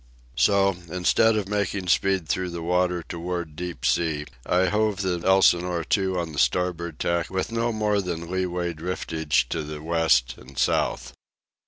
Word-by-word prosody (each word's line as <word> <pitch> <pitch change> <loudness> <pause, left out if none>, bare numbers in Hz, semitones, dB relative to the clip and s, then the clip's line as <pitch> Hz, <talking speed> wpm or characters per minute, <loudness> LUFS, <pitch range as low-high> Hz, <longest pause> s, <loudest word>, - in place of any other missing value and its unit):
So, 100 -2 +3
instead 90 +5 +3
of 105 -3 -1
making 100 -2 -1
speed 95 0 +2
through 90 +3 -1
the 85 -1 -6
water 90 0 +1
toward 85 -2 -4
deep 85 -7 -5
sea, 75 +3 +1 0.2
I 90 +1 +3
hove 105 0 0
the 90 -2 -1
Elsinore 90 -2 +3
to 95 -2 +1
on 85 -2 -3
the 75 - -4
starboard 85 +4 0
tack 85 -1 -1
with 95 +3 -2
no 115 +1 0
more 105 -2 +1
than 85 -3 -4
leeway 90 -2 -1
driftage 80 -4 -1
to 80 - -2
the 75 0 -6
west 80 -8 +2
and 65 +1 -15
south. - - 0
90 Hz, 160 wpm, -25 LUFS, 80-95 Hz, 0.2 s, So